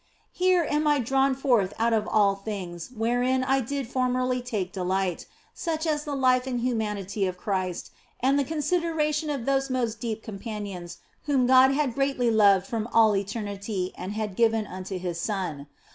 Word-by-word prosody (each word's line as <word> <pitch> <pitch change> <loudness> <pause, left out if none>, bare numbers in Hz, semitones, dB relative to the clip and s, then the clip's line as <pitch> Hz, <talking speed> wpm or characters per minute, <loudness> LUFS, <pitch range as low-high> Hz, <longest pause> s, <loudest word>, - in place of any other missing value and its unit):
Here 365 -2 +2
am 300 +1 +1
I 295 -1 +4
drawn 270 +2 +2
forth 245 -8 +1
put 230 +1 +2
of 215 -1 +1
all 205 -2 +3
things 195 -4 -6
wherein 245 +2 0
I 270 +1 +2
did 270 +1 -3
formerly 255 0 0
take 210 -7 -3
delight, 185 -1 -2 0.3
such 320 -2 -3
as 300 -2 0
the 290 -2 -3
life 255 -1 +3
and 245 -2 -2
humanity 210 -5 -1
of 180 -1 -4
Christ 185 -2 -3 0.3
and 270 +3 +3
the - - +2
consideration 315 0 0
of 275 -5 -3
those 270 0 +1
most 235 -4 -1
deep 225 -2 -4
com 205 -3 -7
panions 195 -6 -6 0.3
whom 275 -4 +2
God 260 +1 +6
had 280 -3 0
greatly 270 -2 +1
loved 200 -3 +5
from 225 +1 -3
all 225 -3 +4
eternity 200 -1 -3
and 185 +3 -5
had 210 -3 -3
given 225 -1 +2
unto 185 0 -6
His 175 -2 -4
Son. 170 -7 -3
230 Hz, 175 wpm, -26 LUFS, 200-270 Hz, 0.3 s, God